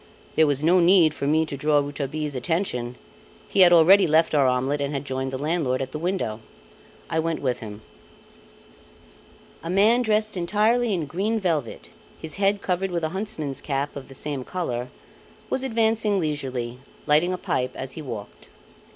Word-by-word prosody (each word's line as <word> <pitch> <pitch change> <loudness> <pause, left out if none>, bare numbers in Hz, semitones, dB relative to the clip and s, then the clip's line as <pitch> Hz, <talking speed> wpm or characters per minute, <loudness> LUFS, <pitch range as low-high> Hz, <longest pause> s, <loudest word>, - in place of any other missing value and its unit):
There 160 -1 +4
was 145 0 0
no 175 +3 +5
need 170 -3 +5
for 140 - -3
me 160 +2 +3
to 145 - -5
draw 150 +2 +2
Rouletabille's 145 +1 -2
attention; 125 -4 -2 0.5
he - - -2
had 180 -2 +8
already 175 +4 +6
left 160 +1 +3
our 140 -3 +4
omelette 130 +3 0
and 140 +1 -2
had 140 +1 -3
joined 130 -1 -3
the 130 - -4
landlord 145 -3 0
at 135 -1 -4
the 150 - -5
window. 170 - -2 0.7
I 160 - -1
went 165 0 -1
with 130 -3 -1
him. 105 -1 -9 1.8
A 165 - -6
man 210 +6 +4
dressed 215 -2 0
entirely 215 +6 +1
in 175 -6 -1
green 200 +10 -1
velvet, 160 - -2 0.3
his 160 +2 -8
head 200 0 +2
covered 185 +1 -1
with 170 -2 -3
a 160 - 0
huntsman's 175 -7 -4
cap 140 0 -3
of 135 -2 -8
the 135 - -11
same 140 -1 -3
colour, 125 -8 -3 0.6
was 265 - 0
advancing 225 -4 +1
leisurely, 130 -6 -3 0.3
lighting 155 +5 +3
a 185 - -2
pipe 130 -7 -2
as 130 0 -5
he 160 - -6
walked. 115 -8 -8
155 Hz, 175 wpm, -24 LUFS, 135-185 Hz, 1.8 s, had